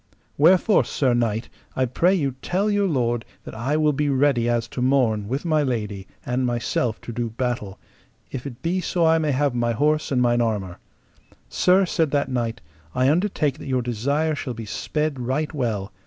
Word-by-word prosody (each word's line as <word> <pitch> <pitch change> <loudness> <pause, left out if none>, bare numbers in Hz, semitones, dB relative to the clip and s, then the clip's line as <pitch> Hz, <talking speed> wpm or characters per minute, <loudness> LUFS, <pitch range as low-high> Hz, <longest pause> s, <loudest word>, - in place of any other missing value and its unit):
Wherefore, 185 +7 +5
sir 130 -4 0
knight, 115 -1 0 0.3
I 130 - +2
pray 175 +10 +2
you 140 -7 0
tell 200 +4 0
your 205 -1 +2
lord 120 -7 0 0.2
that - - -9
I 130 +7 -1
will 150 -1 +3
be 145 +1 0
ready 135 -3 +2
as 120 -1 0
to 125 - -5
morn 125 -6 +2
with 135 +8 -3
my 155 -2 +2
lady, 105 -7 -3 0.2
and 125 +1 -1
myself 120 -2 -1
to - - -7
do 115 0 -2
battle, 115 -4 -3 0.5
if 135 +1 -5
it 130 +1 -10
be 180 +3 0
so 175 -2 +1
I 160 0 +4
may 155 -2 0
have 140 0 +1
my 120 -1 0
horse 150 +5 +1
and 130 - +2
mine 120 -1 +3
armour. 100 -6 -2 0.7
Sir, 185 +2 +4
said 165 -3 0
that 140 -1 0
knight, 120 -2 -2 0.3
I 130 +2 +3
undertake 155 -5 0
that - - -8
your 130 -2 0
desire 140 +7 0
shall 130 -4 -4
be 115 0 -6
sped 150 +6 -2
right 135 +6 -2
well. 110 -8 -2
130 Hz, 190 wpm, -23 LUFS, 120-150 Hz, 0.7 s, Wherefore